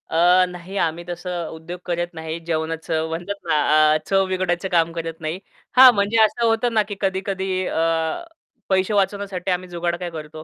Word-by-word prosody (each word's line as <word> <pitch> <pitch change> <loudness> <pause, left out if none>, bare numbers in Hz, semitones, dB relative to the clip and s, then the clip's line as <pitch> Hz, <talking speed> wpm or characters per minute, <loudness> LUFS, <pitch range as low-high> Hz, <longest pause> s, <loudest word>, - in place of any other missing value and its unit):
अ, 180 +3 +5
नाही 180 +2 -9
आम्ही 170 -1 -1
तसं 175 -1 -4
उद्योग 160 +3 -8
करत 175 0 -1
नाही 160 +1 -5
जेवणाचं 160 0 -2
म्हणतात 175 +5 -4
ना, 155 0 +4
अ, - - +3
चव 195 0 +3
बिघडायचं 185 0 -1
काम 170 -2 +2
करत 165 -1 -5
नाही. 160 +3 -3 0.4
हां 260 0 +11
म्हणजे 200 +2 +1
असं 235 +2 +1
होतं 230 +1 +1
ना 215 -1 +3
की 205 - -5
कधी-कधी 190 -1 -1
अ, - - -4 1.0
पैसे 190 +1 +2
वाचवण्यासाठी 195 -2 -1
आम्ही 180 0 -2
जुगाड 170 0 -2
काय 180 - -4
करतो, 155 -1 -8
175 Hz, 175 wpm, -22 LUFS, 165-195 Hz, 1.0 s, हां